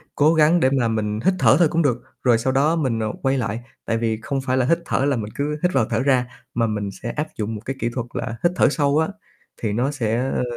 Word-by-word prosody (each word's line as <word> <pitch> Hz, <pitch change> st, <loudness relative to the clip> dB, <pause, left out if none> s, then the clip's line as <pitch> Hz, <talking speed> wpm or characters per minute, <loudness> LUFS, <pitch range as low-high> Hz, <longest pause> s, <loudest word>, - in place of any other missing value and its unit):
cố 155 Hz, +3 st, +4 dB
gắng 160 Hz, +2 st, +4 dB
để 130 Hz, -, +3 dB
mà 120 Hz, -, +2 dB
mình 105 Hz, -1 st, -1 dB
hít 190 Hz, -, +4 dB
thở 120 Hz, -2 st, +6 dB
thôi 170 Hz, -, +6 dB
cũng 165 Hz, 0 st, +2 dB
được, 125 Hz, -4 st, 0 dB, 0.2 s
rồi 120 Hz, -3 st, +4 dB
sau 130 Hz, +3 st, -1 dB
đó 145 Hz, +5 st, +3 dB
mình, 130 Hz, -8 st, 0 dB
à, -, -, -1 dB
quay 135 Hz, 0 st, +1 dB
lại. 115 Hz, -3 st, -2 dB, 0.3 s
Tại 115 Hz, -1 st, 0 dB
vì 115 Hz, -1 st, -1 dB
không 135 Hz, +3 st, -2 dB
phải 130 Hz, -1 st, 0 dB
là 130 Hz, -, +2 dB
hít 170 Hz, +6 st, +2 dB
thở 135 Hz, -, 0 dB
là 145 Hz, -, +2 dB
mình 110 Hz, -3 st, -4 dB
cứ 150 Hz, +1 st, -2 dB
hít 180 Hz, -, +2 dB
vào, 130 Hz, -4 st, +3 dB
thở 110 Hz, -, 0 dB
ra, 130 Hz, -1 st, +2 dB, 0.3 s
mà 115 Hz, -1 st, +1 dB
mình 105 Hz, -2 st, -2 dB
sẽ 120 Hz, -, -2 dB
áp 150 Hz, +1 st, -3 dB
dụng 110 Hz, +1 st, -3 dB
một 105 Hz, -, -7 dB
cái 135 Hz, -, -3 dB
kỹ 115 Hz, -, 0 dB
thuật 125 Hz, -3 st, -3 dB
là 115 Hz, -, -3 dB
hít 175 Hz, -, +4 dB
thở -, -, +4 dB
sâu 145 Hz, 0 st, +1 dB
á, 160 Hz, -, +2 dB, 0.5 s
thì 110 Hz, -3 st, -1 dB
nó 125 Hz, +6 st, 0 dB
sẽ, 115 Hz, -5 st, -1 dB
ơ, 130 Hz, +1 st, -1 dB
130 Hz, 280 wpm, -22 LUFS, 115-145 Hz, 0.5 s, thở